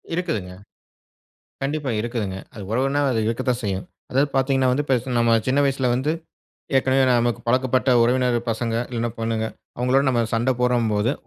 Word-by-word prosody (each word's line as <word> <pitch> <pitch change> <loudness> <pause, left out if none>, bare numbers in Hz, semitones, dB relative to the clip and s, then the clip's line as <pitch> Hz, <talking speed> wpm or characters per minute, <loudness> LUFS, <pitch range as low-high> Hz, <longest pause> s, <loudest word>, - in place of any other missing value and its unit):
இருக்குதுங்க. 155 - -3 1.1
கண்டிப்பா 145 -1 -2
இருக்குதுங்க. 110 -5 -3 0.2
அது 105 - -8
உறவுனா 135 +5 +1
அது 115 - 0
இருக்கத்தான் 125 +1 -1
செய்யும். 95 -2 -2 0.2
அதாவது 140 +3 +2
பார்த்தீங்கன்னா 135 -1 +2
வந்து 145 +3 -1
பெருச 130 -1 0
நம்ம 115 -1 +4
சின்ன 135 +2 +2
வயசுல 135 -2 +1
வந்து, 135 +5 0 0.7
ஏற்கனவே 135 0 +3
நமக்கு 120 -2 +1
பழக்கப்பட்ட 130 +1 +2
உறவினர் 125 0 +2
பசங்க, 115 0 -2 0.2
இல்லனா 120 -1 -2
பொண்ணுங்க 115 -1 -1 0.3
அவங்களோட 125 +3 +2
நம்ம 120 -2 +2
சண்ட 120 +3 +2
போட்றோம்போது, 115 -1 +1
125 Hz, 145 wpm, -22 LUFS, 115-135 Hz, 1.1 s, நம்ம